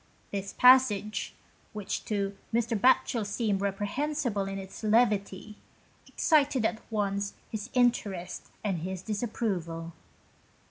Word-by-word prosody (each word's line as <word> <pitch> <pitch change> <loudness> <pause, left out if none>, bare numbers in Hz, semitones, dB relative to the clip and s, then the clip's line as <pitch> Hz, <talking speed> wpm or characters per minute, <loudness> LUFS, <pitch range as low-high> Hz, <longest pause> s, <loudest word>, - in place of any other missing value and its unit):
This 200 -1 -4
passage, 250 -5 +4 0.4
which 210 -2 -4
to 200 -2 -2 0.2
Mr. 230 0 +1
Batchel 235 +1 +3
seemed 205 -1 -1
reprehensible 205 +3 -1
in 195 0 -4
its 190 0 -8
levity, 210 -2 +1 0.5
excited 280 -6 +2
at 225 0 -1
once 200 -1 -1 0.2
his 220 +2 -5
interest 205 -8 0 0.2
and 195 -5 -1
his 185 +2 -5
disapproval. 190 -7 -3
210 Hz, 105 wpm, -29 LUFS, 195-235 Hz, 0.5 s, passage